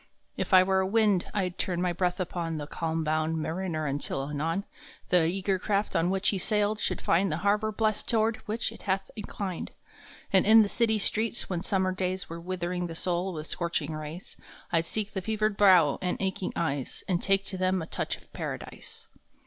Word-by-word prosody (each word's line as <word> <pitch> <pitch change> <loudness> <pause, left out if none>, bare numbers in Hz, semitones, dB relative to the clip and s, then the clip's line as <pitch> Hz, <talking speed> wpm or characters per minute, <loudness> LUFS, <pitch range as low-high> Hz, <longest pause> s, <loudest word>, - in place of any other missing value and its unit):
If - - -3
I 185 -1 +8
were 190 0 +2
wind 205 -2 +2
I 195 -3 0
d 180 - -15
turn 180 -3 -1
my 180 -1 +1
breath 180 +1 0
upon 170 -3 -2
The 145 - -4
calm 160 +1 -2
bound 155 +1 0
mariner 160 0 -2
until, 140 -1 -2
anon, 165 +6 -1 0.5
The 175 -3 +4
eager 190 +2 0
craft 205 +1 -1
on 170 +2 +2
which 195 +1 +1
he 195 - -1
sailed 210 +1 +1
should - - -1
find 180 +2 +2
The 155 - -1
harbor 210 +2 +2
blest 215 0 0
toward 225 -1 +2
which 220 +2 -1
it - - -12
hath 190 +1 0
inclined. 200 -3 -5 0.6
And 190 - +6
in 220 +1 +8
the 205 - -2
city 220 -1 +2
streets, 220 +1 +1
when 175 -2 -1
summer 190 0 +1
s 185 - -7
days 185 0 -2
Were 165 0 -6
withering 180 0 -3
the 165 - -7
soul 180 +2 -1
with 155 -3 -5
scorching 165 -3 -2
rays, 155 +3 -7 0.3
I 165 -2 +4
d 165 - -11
seek 215 -1 -3
the 190 - -2
fevered 215 +1 0
brow 185 -8 +5
and 180 -1 -1
aching 190 -1 -2
eyes 145 -6 -2
And 180 -2 +1
take 195 0 +2
to 190 -1 -5
them 185 0 +2
a 165 - -4
touch - - -3
of - - -24
Paradise. - - -7
185 Hz, 205 wpm, -28 LUFS, 170-200 Hz, 0.6 s, I